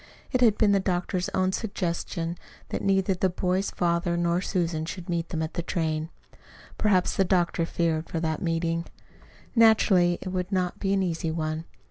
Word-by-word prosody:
It 255 - +1
had 225 -4 +5
been 210 -2 +4
the 200 - +4
doctor's 180 -1 -1
own 185 0 +1
suggestion 170 -4 -3 0.3
that - - -3
neither 195 0 +2
the 185 +1 +1
boy's 185 +2 0
father 170 0 0
nor 170 +1 +1
Susan 170 -5 -1
should 170 +2 -6
meet 170 -1 -1
them 160 -1 -2
at 160 - -4
the 175 - -2
train. 160 -2 -2 0.7
Perhaps 190 -4 +2
the 195 - +5
doctor 175 -2 +1
feared 165 -2 -1
for 165 - -2
that 160 +1 -1
meeting. 165 -1 -1 0.7
Naturally 200 -6 +5
it 185 - -5
would 185 +1 -3
not 180 -2 -1
be 195 - 0
an 195 -1 +2
easy 165 -2 -2
one. 160 0 -2
175 Hz, 175 wpm, -26 LUFS, 165-190 Hz, 0.7 s, had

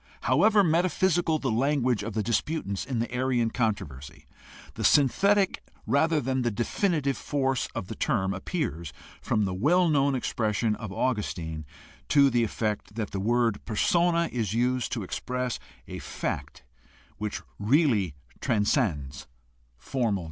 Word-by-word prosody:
However 215 -2 +4
metaphysical 175 -1 +2
the 135 -5 -2
language 130 -1 +1
of 105 +1 -5
the 110 0 -1
disputants 115 - -1
in 130 -3 -3
the 115 +2 -2
Arian 125 -2 +1
controversy, 85 - -3 0.5
the - - -5
synthetic 195 +8 +3 0.2
rather 160 +2 +2
than 130 -1 -1
the 120 - +1
definitive 140 - 0
force 135 -3 -1
of 115 - -3
the 105 - -6
term 95 -3 0
appears 95 - -3 0.3
from 105 - +1
the 95 - -2
well 170 - +3
known 140 -2 +2
expression 110 -3 0
of 105 -3 -7
Augustine 85 - -2 0.4
to 140 -2 +5
the 120 -1 +2
effect 105 -2 -3
that 110 -3 -3
the 100 - -3
word 115 +1 +1
persona 170 - +2
is 110 -4 -2
used 125 +1 0
to 115 -4 -2
express 125 +5 -3 0.3
a - - -6
fact - - -5 0.5
which 105 -1 -4 0.2
really 105 - +2 0.2
transcends 85 - 0 0.5
formal 115 - -1
definition. - - -2
120 Hz, 140 wpm, -27 LUFS, 105-145 Hz, 0.5 s, to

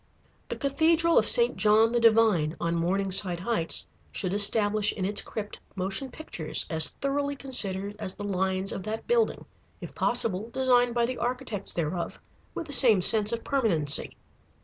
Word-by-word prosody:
The - - -4
Cathedral 325 +4 +2
of - - +1
St. 475 0 +2
John 220 +1 +3
the 240 - 0
Divine, 215 -9 +2
on 170 0 -2
Morningside 185 +1 +1
Heights, 215 -6 0 0.3
should 185 -1 -4
establish 205 0 +4
in 190 - -5
its 205 +1 0
crypt 210 -1 -8 0.2
motion 195 +8 -3
pictures 245 - -2
as 160 -1 +2
thoroughly 280 +1 -3
considered 205 -7 0
as 185 - -6
the 205 - -8
lines 190 -1 -2
of - - -5
that 215 +3 -6
building, 475 -1 0 0.3
if - - -10
possible 215 +1 -1
designed 245 -1 +1
by 235 -1 +1
the 250 +1 -5
architects 240 -4 -4
thereof, 170 +1 -4 0.4
with - - -5
the 290 - -6
same 220 -9 +5
sense 215 +1 +3
of 230 -1 -4
permanency. 175 - +1
215 Hz, 160 wpm, -26 LUFS, 190-250 Hz, 0.4 s, same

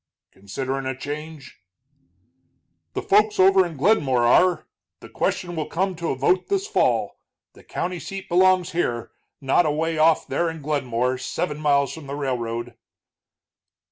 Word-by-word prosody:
"Considerin' 130 +8 -4
a 130 -1 -3
change?" 150 +1 -8 1.3
"The - - -3
folks 210 +1 +3
over 190 0 +6
in 170 -4 -6
Glenmore 135 - +2
are 180 +9 +4 0.3
the - - -13
question 175 -2 -2
will 155 -2 -3
come 190 +2 -1
to 170 0 -3
a - - 0
vote 180 +8 +1
this 395 0 0
fall. 435 - 0 0.3
The - - -18
county 180 0 -4
seat 195 +2 -7
belongs 185 0 +3
here, 120 -9 -2 0.3
not 140 +5 +2
away 160 +2 -1
off 160 0 +4
there 170 - -1
at 160 -2 -8
Glenmore, 130 -4 -1
seven 150 +4 -3
miles 140 -2 +2
from 160 -4 -10
the 140 - -5
railroad." 120 -4 -3
155 Hz, 145 wpm, -23 LUFS, 130-180 Hz, 1.3 s, over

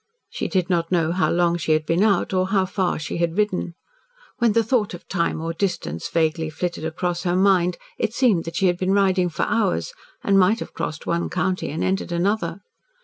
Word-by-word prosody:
She - - -3
did 185 -3 0
not 170 -2 0
know 165 -3 +2
how 185 +2 +1
long 175 0 +2
she 160 -1 +1
had 155 0 +1
been 165 +4 +1
out, 200 -2 +2
or 185 0 +2
how 195 -1 +2
far 185 -1 -1
she 155 - -4
had 170 +1 -1
ridden. 190 -5 0 0.6
When 235 -3 +3
the 230 +1 +3
thought 220 -4 0
of 175 - -14
time 170 -3 -1
or 165 +1 -3
distance 165 - -3
vaguely 160 -1 0
flitted 170 +1 -4
across 170 +2 -2
her 175 -1 0
mind, 185 -2 +3 0.2
it 220 - 0
seemed 220 -11 +3
that 165 - -6
she 195 - +1
had 175 -1 +2
been 185 +1 +1
riding 190 -2 +3
for 165 - -2
hours, 225 - 0 0.3
and 195 -1 +4
might 195 +5 +4
have - - -7
crossed 155 - -4
one 170 0 -1
county 185 0 -1
and 155 - -3
entered 190 -1 -1
another. 175 0 -1
180 Hz, 210 wpm, -23 LUFS, 170-195 Hz, 0.6 s, and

